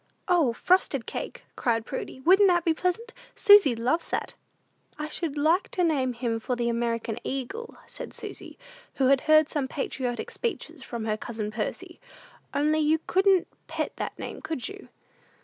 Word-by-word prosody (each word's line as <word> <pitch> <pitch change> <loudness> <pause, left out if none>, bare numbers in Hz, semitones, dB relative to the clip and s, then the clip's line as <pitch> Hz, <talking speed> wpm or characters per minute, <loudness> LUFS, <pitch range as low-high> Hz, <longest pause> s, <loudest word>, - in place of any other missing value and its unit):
"O, 340 -9 +4
Frosted 275 -1 +2
Cake," - - -6
cried 230 -2 0
Prudy: 260 0 -6
"wouldn't 385 +7 +6
that 345 -2 +3
be 330 - +4
pleasant? 375 +8 -2 0.2
Susy 405 - +7
loves 250 +9 0
that." - - -2 0.6
"I 300 - -3
should 305 -1 -3
like 320 +6 +2
to 360 - 0
name 275 -7 +1
him 235 -1 -2
for 250 +3 -2
the 240 -1 0
American 230 -1 -1
Eagle," 335 - -5
said - - -8
Susy, - - -9 0.4
who 265 -1 +3
had 275 -1 +4
heard 310 -1 +5
some 290 -3 -2
patriotic 255 -3 -3
speeches 335 - -4
from 235 -3 -5
her 215 -1 0
cousin 220 -2 -5
Percy; 215 0 -5 0.5
"only 300 +2 +2
you 310 +1 +3
couldn't 380 -1 +3 0.2
pet - - -3
that - - -4
name, - - -7
could 315 -7 -3
you?" 400 0 -10
290 Hz, 165 wpm, -27 LUFS, 240-345 Hz, 0.6 s, Susy